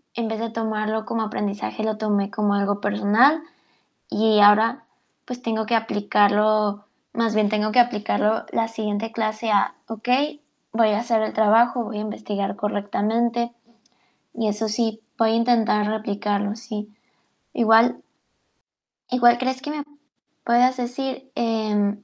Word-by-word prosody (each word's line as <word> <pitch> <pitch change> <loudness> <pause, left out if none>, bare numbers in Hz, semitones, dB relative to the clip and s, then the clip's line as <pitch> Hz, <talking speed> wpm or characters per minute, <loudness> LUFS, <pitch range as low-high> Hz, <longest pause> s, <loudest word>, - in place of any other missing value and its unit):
en 230 -1 -2
vez 220 0 -4
de 230 0 -3
tomarlo 220 -1 -2
como 225 - -2
aprendizaje, 210 0 -4
lo 220 -1 -1
tomé 205 -2 0
como 205 0 0
algo 200 0 0
personal. 215 +9 +3 0.7
Y 215 0 +2
ahora, 220 +6 +5 0.4
pues 250 0 -7
tengo 220 -2 -2
que 235 - +1
aplicarlo, 205 -1 +2 0.3
más 230 -2 0
bien 210 -1 +2
tengo 215 0 0
que 250 - +3
aplicarlo, 220 -2 +1
la 225 0 0
siguiente 220 0 -4
clase 220 0 -2
a: 200 -1 +2
"Okey, 255 +7 -1 0.3
voy 225 -1 +3
a 210 0 +1
hacer 230 -2 0
el - - -3
trabajo, 230 +3 +3
voy 210 0 -6
a 210 - -3
investigar 205 -2 -4
correctamente". 225 +4 -1 0.8
Y 225 -1 -2
eso 215 +2 -2
sí, 220 0 -2 0.2
voy 225 -1 +3
a - - +1
intentar 230 -3 +2
replicarlo, 205 -1 -2
sí. 215 -2 -7 0.6
Igual 225 -1 +4 1.1
Igual, 240 -1 +5
¿crees 260 +1 -2
que 295 +1 -5
me 300 -1 -4
p 295 - -29 0.5
puedas 250 +2 +3
decir, 265 +2 -5
em, 210 -2 -1
220 Hz, 145 wpm, -22 LUFS, 210-235 Hz, 1.1 s, ahora